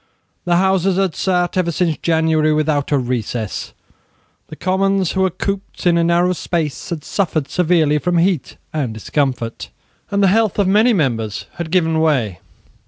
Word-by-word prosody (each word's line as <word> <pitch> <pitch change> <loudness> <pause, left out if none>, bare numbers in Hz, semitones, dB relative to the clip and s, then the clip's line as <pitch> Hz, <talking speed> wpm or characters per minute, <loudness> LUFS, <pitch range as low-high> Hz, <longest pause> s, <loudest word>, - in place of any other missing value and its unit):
The 175 -1 +2
Houses 190 0 +2
had 190 -4 +1
sate 180 0 0
ever 175 -2 +1
since 165 -1 0
January 160 -2 +2
without 150 -2 0
a 145 - +4
recess. 120 -4 -3 0.8
The 155 - -9
Commons, 190 +1 +1
who 190 - -1
were 190 - +3
cooped 195 +2 -5
up - - -8
in 175 -1 +4
a - - +2
narrow 175 +2 +2
space, 165 -4 -3
had 160 -4 -4
suffered 160 -7 -1
severely 160 -4 +2
from 175 +2 0
heat 170 -3 0 0.2
and 135 -8 -2
discomfort; 125 0 -2 0.4
and 200 0 +1
the - - +5
health 220 +1 +2
of 200 -2 +2
many 215 +5 +4
members 115 - -1
had 170 -2 -4
given 165 -2 +2
way. 130 - +1
170 Hz, 170 wpm, -18 LUFS, 150-185 Hz, 0.8 s, the